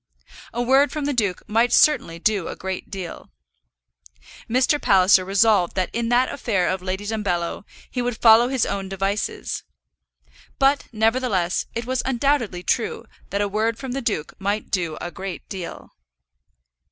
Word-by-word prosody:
A 240 +1 -2
word 270 +3 +4
from 300 -2 -3
the 290 - 0
duke 205 -7 -1
might 230 +3 +2
certainly 280 - +4
do 195 0 0
a - - -5
great 190 0 -5
deal! 190 -4 -7 1.2
Mr. 255 +5 +2
Palliser 190 -3 +5
resolved 195 -1 +3
that 185 -2 -1
in 230 0 -1
that 245 +2 +2
affair 190 -6 0
of 185 0 -1
Lady 190 +2 -4
Dumbello 200 -4 -2 0.2
he 250 - -3
would 245 -2 -2
follow 230 +1 +6
his 260 -2 +1
own 195 -1 -3
devices. 195 +2 -2 1.0
But, 275 +1 +2
nevertheless, 220 -5 +1
it 230 0 -3
was 255 0 -1
undoubtedly 250 -7 0
true 230 +2 -1 0.2
that 200 - -1
a 205 - +1
word 220 +3 0
from 265 0 -6
the 270 +2 -2
duke 205 - -2
might 200 +2 -2
do 170 -5 -1
a 175 - -5
great 190 0 -7
deal! 185 -4 -7
215 Hz, 155 wpm, -23 LUFS, 190-245 Hz, 1.2 s, follow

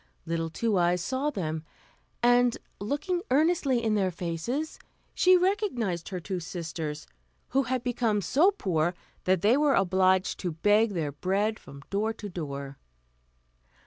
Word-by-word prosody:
Little 165 0 -2
Two 210 +3 0
Eyes 175 +1 +2
saw 260 +10 -1
them, 160 - -3 0.6
and, 245 0 +4 0.2
looking 295 - -1
earnestly 285 -4 +2
in 220 -1 +1
their 195 -3 +2
faces, 180 - -3 0.3
she 370 0 +5
recognised 350 - 0
her 185 - -4
two 185 +1 -4
sisters, 160 -3 -5 0.4
who 270 - +2
had 255 -1 -1
become 240 -4 +1
so 275 - +4
poor 175 - 0 0.3
that 185 -1 +2
they 220 +4 +5
were 290 -1 +3
obliged 185 0 +2
to 180 -3 -3
beg 210 +6 +3
their 155 -4 -1
bread 195 +8 -1
from 140 0 -12
door 215 +3 0
to 215 -1 -8
door. 140 -5 -6
200 Hz, 145 wpm, -28 LUFS, 170-250 Hz, 0.6 s, she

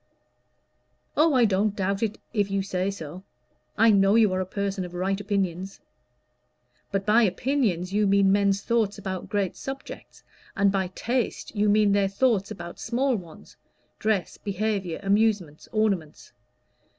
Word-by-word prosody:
"Oh, 310 -1 +4
I 245 -2 +5
don't 205 0 +1
doubt 195 0 -1
it 220 -2 -1 0.2
if 205 -3 +1
you 195 0 0
say 190 0 -1
so. 175 -2 -7 0.6
I 225 +1 +6
know 195 0 +4
you 215 -4 +4
are 185 - 0
a 185 - -4
person 195 0 -2
of 180 0 -8
right 195 +2 -1
opinions." 195 -2 -2 1.1
"But 195 -1 -1
by 215 +3 +5
opinions 200 -4 0
you 210 0 +2
mean 195 0 +4
men's 200 0 +2
thoughts 225 -4 0
about 190 -2 -5
great 200 -3 -1
subjects, 270 0 -8 0.3
and 200 0 +4
by 190 -2 0
taste 245 -1 -2
you 210 0 +2
mean 210 0 +4
their 200 -1 +3
thoughts 200 -1 +1
about 175 -5 -8
small 255 +3 0
ones: 170 -6 -10 0.4
dress, 215 -4 -1
behavior, 200 -3 -2
amusements, 200 -6 +1
ornaments." 200 -8 -1
200 Hz, 150 wpm, -26 LUFS, 190-215 Hz, 1.1 s, I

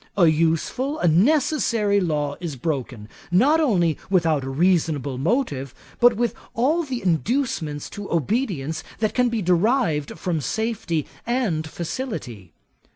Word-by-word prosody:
A 180 - +6
useful, 165 - +1
a 175 - +1
necessary 225 - +3
law 150 -4 -1
is 170 -5 -5
broken, 130 -7 -4 0.2
not 260 - +4
only 175 - +2
without 165 -7 +2
a 135 - -4
reasonable 150 -4 +1
motive, 140 - -1 0.2
but 245 -1 +6
with 240 0 0 0.2
all 290 +9 +2
the 260 - -4
inducements 170 - -1
to 205 -1 -7
obedience 165 - -1
that 215 -1 0
can 250 -1 +2
be 230 -3 -2
derived 180 - +1
from 170 -4 -2
safety 200 - -2 0.2
and 205 -11 0
facility. 155 - -5
175 Hz, 130 wpm, -23 LUFS, 155-240 Hz, 0.2 s, A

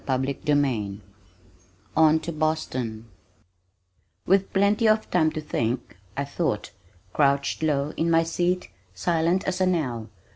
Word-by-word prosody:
CHAPTER 135 +1 0
XXVI 130 -10 0 1.0
On 160 0 +5
to 170 - -4
Boston 130 -8 -2 1.2
With 195 +1 +2
plenty 205 +3 +3
of 215 0 +2
time 160 -3 +3
to 155 - -3
think, 120 -4 -2 0.2
I 140 - -1
thought, 140 -7 -2 0.4
crouched 140 0 +2
low 150 -1 0
in 165 - 0
my 165 0 +4
seat 175 +2 -1 0.3
silent 170 - +1
as 190 0 -2
an 185 -1 +3
owl. 120 -8 -3
155 Hz, 125 wpm, -25 LUFS, 135-175 Hz, 1.2 s, On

